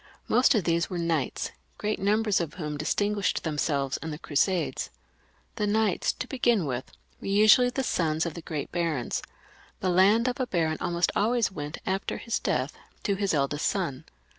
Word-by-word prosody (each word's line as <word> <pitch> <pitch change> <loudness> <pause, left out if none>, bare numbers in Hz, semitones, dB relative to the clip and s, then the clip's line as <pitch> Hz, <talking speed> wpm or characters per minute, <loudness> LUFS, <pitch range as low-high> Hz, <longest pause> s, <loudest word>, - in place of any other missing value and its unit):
Most 255 +2 +4
of 210 - +2
these 170 0 +1
were 180 - -3
knights, 165 -5 -1 0.3
great 210 0 -2
numbers 210 0 +2
of 160 -3 -4
whom 150 -4 -4
distinguished 205 +7 0
themselves 145 -3 0
in 160 - -6
the 150 - -5
Crusades. 170 +4 0 0.7
The 210 -2 0
knights, 215 -2 +2
to - - -5
begin 240 - +2
with, 130 -2 -4 0.3
were - - -7
usually 215 +5 +6
the 265 +2 -2
sons 160 -7 0
of 170 - -3
the 170 - -7
great 155 -3 -5
barons. 165 -8 -1 0.6
The 185 - 0
land 205 +7 +5
of 250 0 -1
a 255 - 0
baron 160 -5 0
almost 175 -1 +1
always 230 0 +2
went 150 -4 -5
at 190 +1 -1
his 230 - -2
death - - -1 0.3
to 200 - +1
his 195 -3 0
eldest 145 +1 0
son. 170 -10 -2
180 Hz, 175 wpm, -27 LUFS, 155-210 Hz, 0.7 s, usually